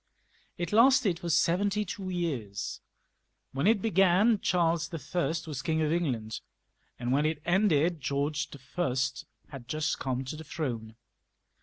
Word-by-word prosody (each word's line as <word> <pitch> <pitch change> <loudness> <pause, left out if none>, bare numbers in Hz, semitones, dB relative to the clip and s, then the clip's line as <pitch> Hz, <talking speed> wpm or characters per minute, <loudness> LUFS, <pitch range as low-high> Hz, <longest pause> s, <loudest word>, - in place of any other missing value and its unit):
It 175 +2 -3
lasted 225 -6 +5
for 175 - -4
seventy 200 +6 +2
two 185 0 -5
years. 135 - -3 0.7
When 140 +6 0
it 215 -3 +3
began 195 +2 +4
Charles 170 -3 +1
L 165 +2 -2
was 150 -5 -5
King 160 +2 0
of 150 - +1
England, 120 -11 -2 0.6
and 120 0 -2
when 145 +3 +3
it 155 -1 -2
ended 175 -4 +2
Oeorge 145 +2 -2 0.2
I. 175 - +2 0.6
had 130 -4 -9
just 155 +3 -1
come 130 0 -2
to 130 - -5
the 160 - -8
throne. 120 -8 -4
160 Hz, 140 wpm, -29 LUFS, 140-180 Hz, 0.7 s, lasted